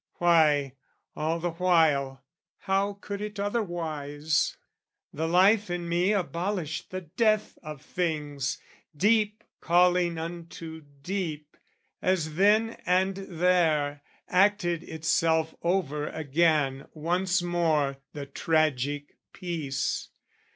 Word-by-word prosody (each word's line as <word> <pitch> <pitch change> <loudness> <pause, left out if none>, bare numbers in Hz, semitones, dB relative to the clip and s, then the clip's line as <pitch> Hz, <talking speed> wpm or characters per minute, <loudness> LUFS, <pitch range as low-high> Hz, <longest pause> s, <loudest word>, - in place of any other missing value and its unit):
Why, 150 -6 +3 0.4
all 160 +2 -1
the 175 +1 -2
while, 160 -6 +2 0.4
how 195 +1 0
could 200 0 -5
it 210 -1 -5
otherwise? 160 -8 -1 0.6
The 160 +2 -2
life 195 +4 +4
in 175 -1 -3
me 175 +4 +2
abolished 180 -4 -2
the 185 0 -5
death 215 +5 0
of 150 -3 -9
things, 150 -5 -2 0.4
Deep 210 +3 +2 0.2
calling 175 0 +3
unto 165 -1 -7 0.2
deep: 160 -6 -4 0.5
as 170 -4 0
then 210 +6 +3
and 185 +2 +3
there 170 -6 +1 0.3
Acted 185 -3 +2
itself 160 0 0
over 160 -5 0
again 150 -3 +1
once 180 +4 0
more 160 -6 +1 0.2
The 145 -2 -6
tragic 145 -1 0 0.2
piece. 155 -7 -3
170 Hz, 100 wpm, -27 LUFS, 150-185 Hz, 0.6 s, life